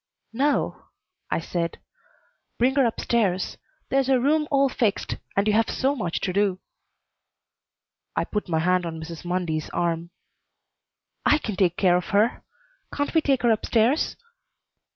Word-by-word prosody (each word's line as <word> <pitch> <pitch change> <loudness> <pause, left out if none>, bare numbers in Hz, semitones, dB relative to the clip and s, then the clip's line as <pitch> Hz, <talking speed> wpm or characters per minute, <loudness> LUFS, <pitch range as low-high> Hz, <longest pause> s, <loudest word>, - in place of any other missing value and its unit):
"No," 280 +5 0 0.4
I - - 0
said. 170 0 -3 0.8
"Bring 250 +3 +3
her 270 -3 +4
up 225 - -4
stairs. 195 -6 0 0.3
There's 270 0 +2
a 260 -2 +4
room 300 +4 +2
all 275 -2 +4
fixed, 225 -5 -1 0.2
and 200 - +3
you 210 - +3
have 225 +1 +3
so 270 +2 0
much 180 -10 -2
to 185 - -1
do." 200 -1 +2 1.6
I - - +1
put 210 -3 -4
my 160 - +1
hand 180 +2 +2
on 160 -1 -5
Mrs. 160 0 -8
Mundy's 175 -3 -2
arm. 170 -1 -1 1.1
"I 300 - +5
can 220 -9 -4
take 180 -2 +2
care 180 -2 +4
of 180 - -3
her. 215 +3 +2 0.5
Can't 285 0 -2
we 320 - +4
take 270 -4 +1
her 240 - +5
up 220 - 0
stairs?" 235 +7 +2
210 Hz, 155 wpm, -25 LUFS, 175-265 Hz, 1.6 s, I